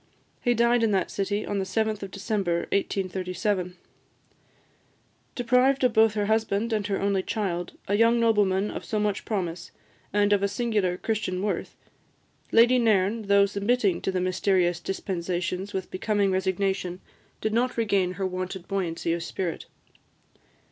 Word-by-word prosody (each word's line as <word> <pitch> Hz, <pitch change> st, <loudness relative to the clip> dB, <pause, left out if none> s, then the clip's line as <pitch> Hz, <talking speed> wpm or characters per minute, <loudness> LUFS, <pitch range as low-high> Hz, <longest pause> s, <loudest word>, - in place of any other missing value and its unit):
He 240 Hz, 0 st, +2 dB
died 235 Hz, +1 st, +3 dB
in 225 Hz, -, +3 dB
that 190 Hz, -, 0 dB
city 205 Hz, +1 st, -2 dB
on 200 Hz, -, -2 dB
the -, -, 0 dB
7th 215 Hz, +2 st, -1 dB
of 195 Hz, -, -5 dB
December 190 Hz, -3 st, -1 dB
1837. 185 Hz, -1 st, -1 dB, 1.6 s
Deprived 250 Hz, +2 st, +3 dB
both 220 Hz, 0 st, +6 dB
of 220 Hz, -, -1 dB
her 205 Hz, -1 st, 0 dB
husband 220 Hz, +1 st, 0 dB
and 210 Hz, -2 st, 0 dB
her 200 Hz, -1 st, -1 dB
only 200 Hz, -1 st, +1 dB
child, 180 Hz, -4 st, -3 dB
a 200 Hz, -, 0 dB
young 230 Hz, +3 st, +4 dB
nobleman 210 Hz, -3 st, +2 dB
of -, -, -6 dB
so 215 Hz, -, -2 dB
much 210 Hz, -1 st, -1 dB
promise, 180 Hz, -5 st, -3 dB, 0.4 s
and 205 Hz, 0 st, +3 dB
of 200 Hz, 0 st, +2 dB
singular 205 Hz, -4 st, 0 dB
Christian 195 Hz, -3 st, -2 dB
worth, 210 Hz, -, -2 dB, 0.8 s
Lady 240 Hz, +2 st, +6 dB
Nairn, 215 Hz, -1 st, +2 dB
though 200 Hz, 0 st, +5 dB
submitting 200 Hz, -1 st, 0 dB
to -, -, -1 dB
the 185 Hz, -, -1 dB
mysterious 180 Hz, -1 st, +1 dB
dispensations 180 Hz, +1 st, -3 dB
with 190 Hz, -2 st, -4 dB
becoming 200 Hz, 0 st, +1 dB
resignation, 190 Hz, -1 st, -1 dB, 0.4 s
did 215 Hz, -, -2 dB
not 245 Hz, +2 st, +1 dB
regain 200 Hz, -5 st, +1 dB
her 190 Hz, +1 st, -3 dB
wonted 185 Hz, 0 st, -4 dB
buoyancy 170 Hz, -4 st, -1 dB
of 170 Hz, -, -2 dB
spirit. 170 Hz, 0 st, -4 dB
200 Hz, 150 wpm, -26 LUFS, 185-220 Hz, 1.6 s, both